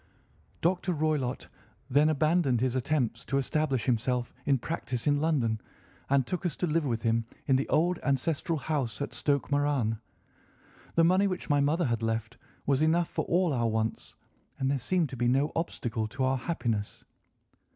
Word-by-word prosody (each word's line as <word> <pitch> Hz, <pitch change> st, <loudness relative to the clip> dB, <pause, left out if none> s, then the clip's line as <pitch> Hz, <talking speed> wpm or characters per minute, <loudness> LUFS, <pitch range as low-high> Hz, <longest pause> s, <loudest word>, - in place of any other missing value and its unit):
Dr. 180 Hz, +1 st, +1 dB
Roylott 150 Hz, -5 st, -1 dB, 0.4 s
then 145 Hz, +3 st, +4 dB
abandoned 155 Hz, -4 st, +2 dB
his 130 Hz, +1 st, 0 dB
attempts 125 Hz, -3 st, 0 dB
to 135 Hz, -, 0 dB
establish 140 Hz, -2 st, 0 dB
himself 125 Hz, 0 st, 0 dB
in 140 Hz, -2 st, +4 dB
practice 125 Hz, -3 st, -3 dB
in 145 Hz, -1 st, +2 dB
London 125 Hz, -9 st, +1 dB, 0.5 s
and 140 Hz, -2 st, +3 dB
took 180 Hz, +7 st, -3 dB
us 175 Hz, -, -1 dB
to -, -, -1 dB
live 160 Hz, -2 st, +1 dB
with 115 Hz, -2 st, -2 dB
him 115 Hz, -1 st, +1 dB, 0.2 s
in 135 Hz, -, +3 dB
the 135 Hz, -, 0 dB
old 175 Hz, +2 st, +2 dB
ancestral 155 Hz, +4 st, 0 dB
house 135 Hz, -7 st, -2 dB
at 140 Hz, -, -4 dB
Stoke 145 Hz, -1 st, 0 dB
Moran. 140 Hz, -6 st, +1 dB, 1.0 s
The 165 Hz, -, +5 dB
money 185 Hz, +4 st, +4 dB
which 185 Hz, -4 st, -3 dB
my 145 Hz, -, +4 dB
mother 150 Hz, +5 st, +2 dB
had 115 Hz, -3 st, 0 dB
left 115 Hz, +1 st, -2 dB, 0.3 s
was 140 Hz, 0 st, +2 dB
enough 165 Hz, +2 st, +3 dB
for -, -, -2 dB
all 175 Hz, -2 st, +2 dB
our 120 Hz, -3 st, +1 dB
wants, 110 Hz, 0 st, -2 dB, 0.4 s
and 135 Hz, 0 st, 0 dB
there 140 Hz, -, 0 dB
seemed 165 Hz, +5 st, 0 dB
to 130 Hz, -, -7 dB
be 120 Hz, 0 st, +1 dB
no 135 Hz, +5 st, +2 dB
obstacle 120 Hz, -9 st, -2 dB
to 130 Hz, +4 st, -3 dB
our 130 Hz, +1 st, +2 dB
happiness. 115 Hz, -9 st, -2 dB
140 Hz, 170 wpm, -29 LUFS, 120-155 Hz, 1.0 s, The